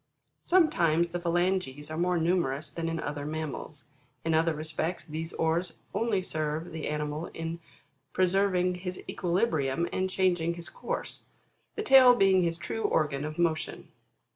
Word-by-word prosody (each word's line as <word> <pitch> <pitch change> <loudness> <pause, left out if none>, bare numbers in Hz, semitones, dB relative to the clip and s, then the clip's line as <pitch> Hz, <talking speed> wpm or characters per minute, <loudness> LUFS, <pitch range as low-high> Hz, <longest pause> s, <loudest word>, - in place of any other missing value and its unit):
Sometimes, 170 - +3
the 175 - -2
phalanges 175 -4 -1
are - - -3
more 180 0 +2
numerous 160 -4 0
than 165 -1 -3
in 165 0 -2
other 145 -1 -4
mammals; 150 -1 -5 0.4
in 165 - +1
other 160 0 +2
respects 155 +3 -3
these 160 +1 -5
oars 165 +2 0 0.2
only 220 -5 0
serve 155 0 -3
the 160 -1 -4
ani 150 0 -1
mal 150 +3 -4
in 165 +1 -4 0.5
preserving 185 -1 +2
his 180 -1 -4
equilibrium 170 - 0
and 185 0 0
changing 175 -3 +1
his 170 0 -6
course; - - -5 0.6
the 430 - -2
tail 260 - +8
being 195 -4 +4
his 170 -1 0
true 225 +6 -4
organ 150 -7 +1
of 155 +1 -5
motion. 165 -2 -1
170 Hz, 150 wpm, -29 LUFS, 155-185 Hz, 0.6 s, tail